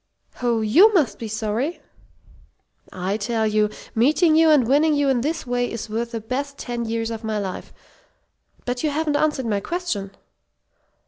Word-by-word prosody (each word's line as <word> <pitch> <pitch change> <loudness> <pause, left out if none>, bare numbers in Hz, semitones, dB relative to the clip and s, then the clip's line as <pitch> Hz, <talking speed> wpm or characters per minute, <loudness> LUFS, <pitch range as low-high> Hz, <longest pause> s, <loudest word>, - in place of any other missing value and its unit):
Oh, 235 -2 +1
you 320 - +6
must 310 -8 +2
be 230 - -5
sorry?" 220 +8 -2 1.1
"I 190 +3 -2
tell 225 +1 -1
you, 215 0 +2 0.2
meeting 310 +8 +3
you 320 0 +5
and 285 -7 +4
winning 295 +4 +3
you 285 -1 +2
in 255 -3 +2
this 315 +4 -2
way 245 0 -1
is 230 -1 -6
worth 230 +2 -2
the 230 -1 -4
best 275 +5 -4
ten 240 -1 -4
years 225 0 -2
of 225 0 -6
my 220 -1 -2
life. 195 -3 -5 0.9
But 245 0 -2
you 305 - +2
haven't 300 0 -1
answered 295 -3 +1
my 210 -3 0
question." 270 - -3
240 Hz, 170 wpm, -22 LUFS, 220-295 Hz, 1.1 s, you